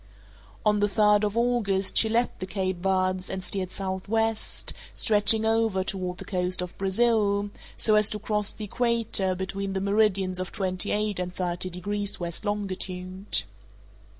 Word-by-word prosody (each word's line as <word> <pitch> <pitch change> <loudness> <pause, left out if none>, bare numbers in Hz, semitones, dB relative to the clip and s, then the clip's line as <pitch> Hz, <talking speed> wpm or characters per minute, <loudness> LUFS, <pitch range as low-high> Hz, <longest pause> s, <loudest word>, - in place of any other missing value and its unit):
On 210 -1 +3
the 205 - +3
third 210 +1 +3
of 210 +1 -1
August, 225 -5 +1
she 220 - +6
left 235 +2 0
the 185 - -5
Cape 190 -2 -2
Verds 185 0 0
and 190 -1 -4
steered 185 -1 -2
southwest, 205 +4 -2 0.2
stretching 220 0 +4
over 225 -4 +1
toward 185 -2 -3
the - - -9
coast 180 -1 0
of 180 - -8
Brazil, 205 0 +1 0.3
so 215 - +3
as 210 0 +6
to 210 - -3
cross 210 -1 0
the 215 - -6
equator 225 -4 0
between 195 +1 -4
the 190 - -1
meridians 195 -2 +1
of 185 - -4
twenty 185 -2 +2
eight 210 -3 -1
and 180 0 -4
thirty 180 0 -2
degrees 200 +3 -2
west 170 +3 -5
longitude. 190 - 0
195 Hz, 155 wpm, -26 LUFS, 185-210 Hz, 0.3 s, she